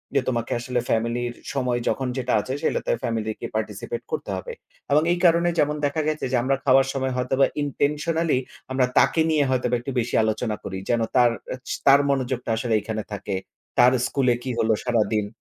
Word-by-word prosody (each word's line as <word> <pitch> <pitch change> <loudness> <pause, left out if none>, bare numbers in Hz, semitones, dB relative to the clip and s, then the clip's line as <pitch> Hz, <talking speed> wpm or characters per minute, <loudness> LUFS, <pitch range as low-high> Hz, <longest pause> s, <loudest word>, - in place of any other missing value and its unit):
যে, 135 - +4
"তোমাকে 120 -2 -2
আসলে 125 +1 -2
ফ্যামিলির 120 +2 0 0.2
সময় 125 -3 0
যখন 130 -1 0
যেটা 125 -1 -1
আছে 130 - -5
সেটাতে - - 0
ফ্যামিলিকে 110 -2 -2
participate 110 - -4
করতে 465 - -3
হবে।" 485 - -6 0.4
এবং 150 +2 +5
এই 175 - +1
কারণে 170 0 +4
যেমন 150 +1 +2
দেখা 155 +2 0
গেছে 155 0 -1
যে - - +2
আমরা 135 +1 +2
খাওয়ার 135 0 +5
সময় 130 -1 -1
হয়তোবা 130 +2 +2 0.2
intentionally 150 +2 0 0.3
আমরা 130 -1 +3
তাকে 160 - +3
নিয়ে 150 -3 +3
হয়তোবা 125 -1 +1
একটু 130 +3 -5
বেশি 120 +1 -2
আলোচনা 110 0 -1
করি। 95 - -5
যেন 115 -1 +2
তার 120 -2 +5 0.2
অ্যা 130 - -4
চি - - -2
তার 140 +1 +8
মনোযোগটা 130 -3 -1
আসলে 115 -1 -1
এখানে 110 0 -4
থাকে। 100 -1 -4 0.4
তার 125 +1 +7 0.2
স্কুলে 130 -3 +2
কি 130 - -4
হলো 110 0 +3
সারাদিন। 110 -3 +1
125 Hz, 185 wpm, -24 LUFS, 115-140 Hz, 0.4 s, তার